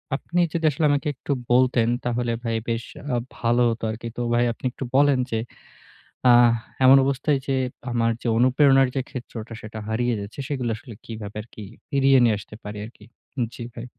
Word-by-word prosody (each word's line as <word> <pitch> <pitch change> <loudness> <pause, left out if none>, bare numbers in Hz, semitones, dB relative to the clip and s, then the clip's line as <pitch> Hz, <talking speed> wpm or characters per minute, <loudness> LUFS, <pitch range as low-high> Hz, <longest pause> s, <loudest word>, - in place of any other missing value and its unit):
আপনি 175 +5 -1
যদি 165 -1 -1
আসলে 155 +3 0
আমাকে 145 0 0
একটু 140 - -6 0.2
বলতেন 125 -2 +4 0.2
তাহলে 120 0 0
ভাই 115 -1 -1
বেশ 115 0 -1 0.3
আ - - +2 0.2
ভালো 120 +1 +2
হতো 115 0 -4
আরকি। 115 +2 -6
তো 120 - -2
ভাই 120 +1 +3
আপনি - - -11
একটু 135 - -7
বলেন 140 -1 +4
যে 115 - 0 0.9
আ - - +9 0.5
এমন 135 +1 +9
অবস্থায় 140 +1 +1
যে 135 - +1 0.4
আমার 115 -1 +2
যে - - -4
অনুপ্রেরণার 135 +1 +5
যে 135 - +1
ক্ষেত্রটা 120 -3 -7
সেটা 110 0 -8
হারিয়ে 120 +2 0
যাচ্ছে 100 +6 -8
সেগুলো 125 -5 -2
আসলে 115 0 -11
কিভাবে 110 -2 -7
আরকি 110 -1 -11 0.3
ফিরিয়ে 135 -1 +4
নিয়ে 115 -3 +4
আসতে 105 +2 -11
পারি 105 0 -7
আরকি? 110 -2 -14 0.5
জি 120 - -7
ভাই। 120 - -7
120 Hz, 180 wpm, -24 LUFS, 115-135 Hz, 0.9 s, আ